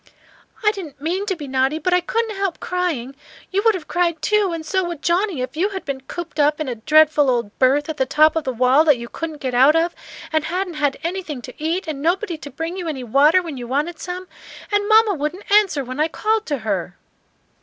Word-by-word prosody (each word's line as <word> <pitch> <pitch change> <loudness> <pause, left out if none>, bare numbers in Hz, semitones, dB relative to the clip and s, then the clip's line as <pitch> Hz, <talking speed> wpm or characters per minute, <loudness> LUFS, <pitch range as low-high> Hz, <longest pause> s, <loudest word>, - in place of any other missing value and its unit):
"I 425 - +6
didn't 340 -10 -9
mean 360 +7 -2
to 380 - 0
be 300 -4 -8
naughty, 265 +3 +1
but 360 +3 0
I 360 - +4
couldn't 455 +1 -2
help 390 -3 -2
crying. 320 -8 -2 0.4
You 390 +1 +1
would 450 -2 +4
have 345 -5 -7
cried 345 -2 0
too, 420 -1 +2
and 330 -1 -5
so 375 +3 0
would 345 -4 -6
Johnnie, 350 -5 +1
if 255 - -6
you 370 +6 +1
had 385 -2 -6
been 275 -3 -4
cooped 325 +2 -7
up 295 +1 +3
in 310 - -2
a 250 - -2
dreadful 300 +4 +4
old 235 -4 -1
berth 275 +3 +3
at 315 -2 -4
the 265 - 0
top 310 +3 +4
of 320 - 0
the 260 - -2
wall 255 +4 +4
that 295 -5 +5
you 235 0 -7
couldn't 315 +2 -6
get 255 -2 -2
out 265 +5 +5
of, 335 +1 +2 0.4
and 315 -1 +1
hadn't 360 +2 -2
had 290 -3 0
anything 335 -5 -4
to 255 +4 -10
eat, 335 +4 -1
and 295 -3 -4
nobody 355 +3 0
to 290 -2 -9
bring 325 +6 -5
you 360 -3 -4
any 275 -5 -4
water 290 +9 +4
when 320 -5 -6
you 240 -1 -6
wanted 300 +6 -2
some. 365 +1 -6 0.4
And 410 0 +1
mamma 435 -1 +5
wouldn't 325 +6 -4
answer 395 -9 +4
when 255 +2 -7
I 310 - +3
called 435 +6 -1
to 290 - -1
her." 185 -3 -2
315 Hz, 235 wpm, -21 LUFS, 275-365 Hz, 0.4 s, I